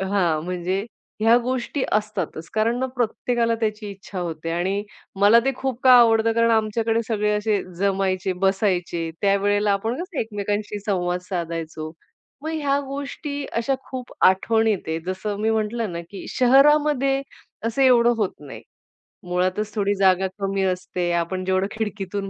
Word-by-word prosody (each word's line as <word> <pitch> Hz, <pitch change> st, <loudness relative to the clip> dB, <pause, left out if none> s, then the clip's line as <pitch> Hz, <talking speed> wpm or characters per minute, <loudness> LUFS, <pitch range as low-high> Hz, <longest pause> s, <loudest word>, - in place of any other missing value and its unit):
हां, 185 Hz, -5 st, +1 dB
म्हणजे 180 Hz, +2 st, -2 dB, 0.4 s
ह्या 225 Hz, +2 st, +5 dB
गोष्टी 255 Hz, +2 st, -2 dB
असतातच. 205 Hz, -6 st, -2 dB
कारण 225 Hz, +2 st, +1 dB
मग 260 Hz, 0 st, -1 dB
प्रत्येकाला 235 Hz, 0 st, 0 dB
त्याची 215 Hz, -1 st, -2 dB
इच्छा 195 Hz, -1 st, -9 dB
होते 165 Hz, -1 st, -4 dB
आणि 185 Hz, +4 st, -1 dB, 0.4 s
मला 215 Hz, +3 st, +7 dB
ते 270 Hz, -, +2 dB
खूप 260 Hz, -2 st, -3 dB
का 255 Hz, -, +8 dB
आवडतं 225 Hz, -1 st, +4 dB
कारण 230 Hz, 0 st, +3 dB
आमच्याकडे 225 Hz, +1 st, +1 dB
सगळे 210 Hz, -1 st, 0 dB
असे 210 Hz, -1 st, 0 dB, 0.2 s
जमायचे, 195 Hz, -1 st, 0 dB
बसायचे. 180 Hz, -4 st, 0 dB
त्यावेळेला 205 Hz, +1 st, +2 dB
आपण 220 Hz, +4 st, -1 dB
कसं 365 Hz, -5 st, -7 dB
एकमेकांशी 205 Hz, -1 st, -3 dB
संवाद 180 Hz, -2 st, 0 dB
साधायचो. 165 Hz, -3 st, -4 dB, 0.5 s
मग 315 Hz, -, -3 dB
ह्या 285 Hz, -3 st, +1 dB
गोष्टी 285 Hz, +1 st, -5 dB
अशा 235 Hz, +4 st, +1 dB, 0.2 s
खूप 255 Hz, -1 st, -6 dB
आठवणीत 220 Hz, +3 st, +3 dB
आहे. 160 Hz, 0 st, -1 dB
जसं 200 Hz, +2 st, -3 dB
मी 220 Hz, -, +1 dB
म्हटलं 220 Hz, -2 st, -1 dB
ना, 170 Hz, -, -4 dB
की 200 Hz, -, -8 dB
शहरामध्ये 275 Hz, +1 st, +4 dB, 0.5 s
असं 230 Hz, +4 st, 0 dB
एवढं 240 Hz, -2 st, +5 dB
होत 210 Hz, -4 st, 0 dB
नाही. 145 Hz, -2 st, -10 dB, 0.7 s
मुळातच 185 Hz, +4 st, -1 dB
थोडी 205 Hz, -1 st, +1 dB
जागा 190 Hz, -1 st, +3 dB
कमी 195 Hz, 0 st, -1 dB
असते, 180 Hz, -1 st, -1 dB
आपण 170 Hz, +2 st, -1 dB
जेवढं 190 Hz, +1 st, +1 dB
खिडकीतून 205 Hz, -2 st, -4 dB
205 Hz, 145 wpm, -23 LUFS, 185-230 Hz, 0.7 s, का